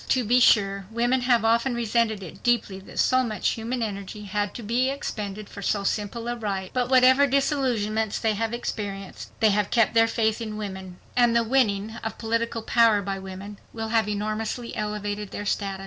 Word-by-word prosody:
To 255 - +2
be 245 +3 +3
sure, 195 -5 +3
women 240 +3 +1
have 245 -2 +3
often 235 +3 +2
resented 230 -3 0
it 175 - -10
deeply 230 -5 +1
that 195 - -13
so 255 0 +3
much 215 -4 -1
human 235 +2 -2
energy 205 0 -5
had 205 0 -2
to 235 - -6
be 240 +5 +1
expended 215 -7 -5
for 200 - -10
so 200 0 0
simple 215 +4 -2
a 240 - -1
right. 195 -5 -4
But 250 -1 0
whatever 260 +2 +6
disillusionments 245 -6 0
they 220 -1 +1
have 225 +2 -2
experienced, 200 -5 -5
they 220 -1 +5
have 205 0 +1
kept 230 -4 +3
their 225 0 +5
faith 220 0 0
in 215 -2 -5
women. 190 -3 -6 0.2
And 240 -1 +4
the 235 - +4
winning 220 -3 +1
of 225 - -4
political 230 0 -2
power 225 -3 +4
by 195 0 -3
women 190 +2 -8
will 225 -1 -4
have 225 -2 +2
enormously 215 +3 -3
elevated 210 -1 -3
their 205 - -6
status. 195 -1 -2
220 Hz, 190 wpm, -25 LUFS, 205-235 Hz, 0.2 s, whatever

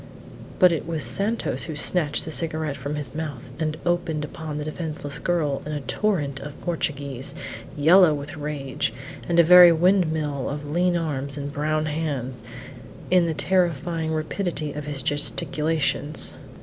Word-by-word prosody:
But 180 -2 +6
it 165 -1 -2
was 160 -3 -1
Santos 215 +4 -1
who 160 - -5
snatched 150 0 +2
the 160 - -5
cigarette 155 -2 -2
from 140 +2 -4
his 145 -4 -5
mouth, 150 -5 -5 0.2
and 155 -1 -1
opened 175 -3 0
upon 155 -1 -6
the 150 - -4
defenceless 155 -2 -4
girl 155 -6 0
in 150 - -5
a 145 - -3
torrent 145 - -1
of 145 +1 -9
Portuguese, 140 -5 -2 0.4
yellow 170 +4 +7
with 145 +2 -4
rage, 145 -6 -3 0.4
and 170 0 +3
a - - +9
very 175 +1 +9
windmill 160 -5 +2
of 145 +1 -5
lean 175 +3 +2
arms 140 -4 -2
and 145 0 -5
brown 155 +1 0
hands 140 -6 -2 0.7
in 180 -2 +5
the 165 -2 -1
terrifying 170 -3 0
rapidity 155 -1 -2
of 150 -1 -6
his 145 -3 -4
gesticulations. 150 +1 -1
155 Hz, 150 wpm, -24 LUFS, 145-170 Hz, 0.7 s, a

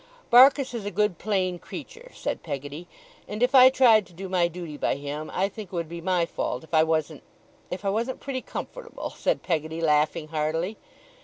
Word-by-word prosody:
Barkis 265 +2 +7
is 235 -3 -4
a 205 - -3
good 205 -1 0
plain 185 -4 -1
creature,' - - -10
said - - -3
Peggotty, 145 +5 -6 0.4
'and 210 +3 -3
if 250 - +2
I 260 -1 +9
tried 230 -7 +5
to 175 - -19
do 190 +3 -7
my 180 -2 +2
duty 170 -3 -7
by - - 0
him, 145 +2 -5
I 195 - +1
think 205 +1 -9
it 185 - -8
would 170 -2 -2
be 170 +1 -7
my 180 -1 +1
fault 125 -5 -3
if 160 - -18
I 155 - +6
wasn't 160 -1 -1 0.5
if 185 +3 -6
I - - +2
wasn't 235 +5 -2
pretty 260 -2 -4
comfortable,' 475 - -7
said - - -1
Peggotty, 160 -2 -2
laughing 150 -1 +1
heartily. 160 +6 -2
180 Hz, 200 wpm, -26 LUFS, 160-225 Hz, 0.5 s, I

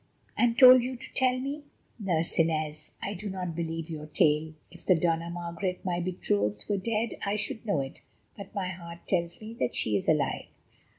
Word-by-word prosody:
"And 235 -1 +2
told 255 -1 +10
you 255 +2 -3
to 255 +2 -11
tell 255 -1 +3
me? 280 +3 -4 0.4
Nurse 170 -6 0
Inez, 155 -1 0
I 200 - -2
do 205 +2 -5
not 180 -3 -4
believe 165 -1 -3
your 155 -2 -6
tale. 155 0 +2 0.2
If - - -14
the 185 - +5
Dona 165 0 +1
Margaret, 175 +2 -4
my 175 -2 0
betrothed, 105 - -1
were 205 - +1
dead 225 +3 -1
I 200 +1 0
should 215 +2 -4
know 175 -9 +2
it; 135 0 -6 0.3
but 200 +1 -10
my 190 -2 -1
heart 170 -2 -9
tells 170 -2 0
me 220 +1 -8
that 125 - 0
she 110 -5 0
is 100 - 0
alive." - - +1
175 Hz, 190 wpm, -29 LUFS, 160-210 Hz, 0.4 s, told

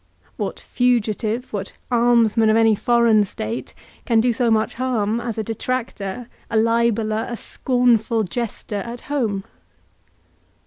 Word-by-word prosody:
What - - -4
fugitive, 235 -1 0
what 200 -1 -4 0.2
almsman 230 -2 +4
of 215 - +4
any 225 -1 +5
foreign 230 0 +3
state, 120 - -5 0.3
can 230 -1 +3
do 240 +1 +2
so 235 +1 +1
much 220 -1 +1
harm 235 -3 0
as 235 -2 -4
a 220 - -1
detractor, 230 -1 -4 0.2
a 225 - 0
libeller, 225 -1 +1
a 240 - -4
scornful 235 -3 +1
jester 215 +1 -4
at 235 +4 -6
home? 225 -9 -2
230 Hz, 130 wpm, -21 LUFS, 215-240 Hz, 0.3 s, any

